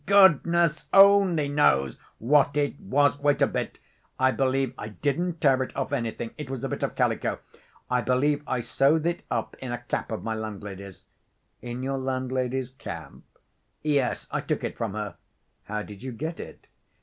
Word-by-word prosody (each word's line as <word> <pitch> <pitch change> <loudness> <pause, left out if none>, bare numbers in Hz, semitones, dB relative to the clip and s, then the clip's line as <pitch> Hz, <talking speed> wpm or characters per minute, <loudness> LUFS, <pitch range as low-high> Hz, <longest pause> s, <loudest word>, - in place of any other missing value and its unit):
"Goodness 170 -4 +4
only 195 -6 +6
knows 70 - +3 0.2
what 140 +4 +3
it 145 -1 0
was. 145 +6 +2
Wait 145 0 +2
a - - +5
bit.... - - -3 0.4
I 130 0 +4
believe 135 -1 0
I 105 - -6
didn't 160 - -2
tear 135 -4 +4
it 130 - -4
off 135 +1 -2
anything. 115 -3 -2
It 150 -3 -6
was 130 -3 -5
a - - -2
bit - - -4
of - - -2
calico.... - - 0 0.5
I 125 0 +1
believe 145 +4 +1
I 125 -2 0
sewed 145 +6 +2
it 170 0 0
up - - -2
in 130 -2 -5
a 120 - -2
cap 120 - -3
of 110 - -4
my 115 - -2
landlady's." 100 -3 -7 0.6
"In 120 +1 -5
your 135 0 -1
landlady's 130 -1 -2
cap?" 85 -11 -8 0.7
"Yes. 145 -4 0
I - - -1
took - - -2
it - - -3
from 115 -4 -3
her." 105 -1 -5 0.5
"How 105 +1 -3
did 105 -1 -11
you 130 0 -5
get 160 +8 -5
it?" - - -10
130 Hz, 175 wpm, -26 LUFS, 120-150 Hz, 0.7 s, only